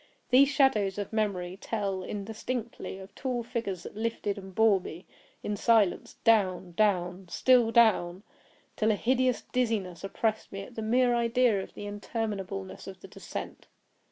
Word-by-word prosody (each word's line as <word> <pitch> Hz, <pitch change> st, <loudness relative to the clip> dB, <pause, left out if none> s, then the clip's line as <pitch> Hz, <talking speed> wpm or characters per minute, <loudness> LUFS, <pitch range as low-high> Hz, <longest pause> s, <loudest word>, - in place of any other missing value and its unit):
These 270 Hz, +2 st, +7 dB
shadows 220 Hz, -9 st, +2 dB
of 205 Hz, +1 st, -4 dB
memory 190 Hz, -4 st, -1 dB
tell, 200 Hz, -4 st, -2 dB
indistinctly, 220 Hz, +3 st, -5 dB
of 195 Hz, +1 st, -11 dB
tall 250 Hz, -1 st, -3 dB
figures 200 Hz, -7 st, -4 dB
that -, -, -9 dB
lifted 220 Hz, -2 st, -2 dB
and 190 Hz, -1 st, -11 dB
bore 220 Hz, -3 st, +5 dB
me 175 Hz, +1 st, -9 dB, 0.4 s
in 210 Hz, -, -2 dB
silence 215 Hz, -3 st, +2 dB
down—down—still 195 Hz, +2 st, +2 dB
down—till 215 Hz, 0 st, +1 dB
a -, -, +2 dB
hideous 255 Hz, +2 st, +1 dB
dizziness 210 Hz, -9 st, -1 dB
oppressed 220 Hz, +2 st, -2 dB
me 195 Hz, -, -5 dB
at 245 Hz, -, -12 dB
the 225 Hz, -, -5 dB
mere 245 Hz, +3 st, +3 dB
idea 235 Hz, -3 st, +2 dB
of -, -, -10 dB
the 205 Hz, -, -7 dB
interminableness 205 Hz, -2 st, -4 dB
of 190 Hz, -1 st, -9 dB
the -, -, -10 dB
descent. -, -, -8 dB
210 Hz, 140 wpm, -29 LUFS, 195-230 Hz, 0.4 s, These